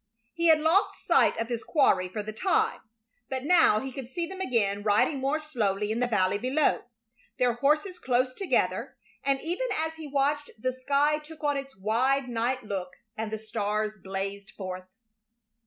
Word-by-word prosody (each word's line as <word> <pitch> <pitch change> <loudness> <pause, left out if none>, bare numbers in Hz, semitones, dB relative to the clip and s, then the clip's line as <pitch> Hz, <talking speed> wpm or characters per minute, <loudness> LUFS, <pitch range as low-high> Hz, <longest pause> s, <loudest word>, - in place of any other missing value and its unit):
He 335 0 +1
had 320 -1 +7
lost 330 +6 +3
sight - - +4
of 230 - -1
his 235 -1 -3
quarry 190 - +3
for 210 +3 -4
the 215 +1 -6
time, 430 - +1 0.5
but 260 -1 -3
now 315 -9 +5
he 265 +3 -5
could 255 -2 -7
see 340 +6 -2
them 380 +2 -7
again 205 - 0
riding 210 +7 +2
more 275 +4 0
slowly 210 -9 -1
in 225 - -1
the 245 - +2
valley 200 -3 +1
below, 270 +5 +1 0.5
their 245 -1 +3
horses 300 - +1
close 255 0 +1
together, 390 +6 -1 0.3
and 275 -1 +1
even 355 +10 -2
as 320 0 -1
he 315 -2 -7
watched 290 +1 0
the 255 +4 -1
sky 285 +4 +1
took 305 0 -13
on 290 -1 +2
its 275 -3 -6
wide 250 +7 +1
night 245 +2 -1
look 190 -3 -4 0.2
and 220 0 -3
the 220 - -2
stars 215 -1 -2
blazed 195 +1 -5
forth. 185 -1 -7
255 Hz, 175 wpm, -28 LUFS, 215-300 Hz, 0.5 s, had